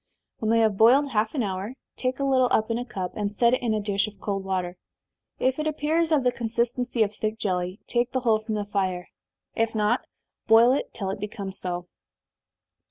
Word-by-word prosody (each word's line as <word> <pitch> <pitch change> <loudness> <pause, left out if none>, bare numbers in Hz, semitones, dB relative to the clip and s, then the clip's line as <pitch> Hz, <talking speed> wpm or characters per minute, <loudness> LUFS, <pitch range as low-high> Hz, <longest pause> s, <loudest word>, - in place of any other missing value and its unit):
When 220 - -1
they 230 0 +4
have 215 -3 +2
boiled 265 +5 +5
half 220 +3 0
an 260 - +1
hour, 195 +4 -4 0.2
take 255 0 -2
a - - 0
little 260 -2 +3
up 220 +1 +1
in 230 - 0
a 245 - -4
cup, 190 -7 -4
and 205 -1 -3
set 235 +3 +4
it 255 - +1
in 230 -3 0
a - - 0
dish 200 0 0
of 205 -2 -11
cold 195 -1 -3
water 185 -2 -2 0.6
if 260 +2 0
it 305 - -1
appears 315 +2 0
of 295 -4 +3
the 250 - +3
consistency 240 0 0
of 205 -1 -3
thick 215 +1 -3
jelly, 185 -1 -2
take 240 0 0
the 260 - -1
whole 225 -3 +3
from 220 0 -4
the 205 -1 -2
fire 190 -3 -2 0.4
if 225 0 0
not, 210 -1 +1 0.4
boil 230 +2 +7
it 275 - -1
till 195 -3 -3
it 195 - -5
becomes 200 -2 -4
so. 175 -1 -3
220 Hz, 215 wpm, -25 LUFS, 200-245 Hz, 0.6 s, boil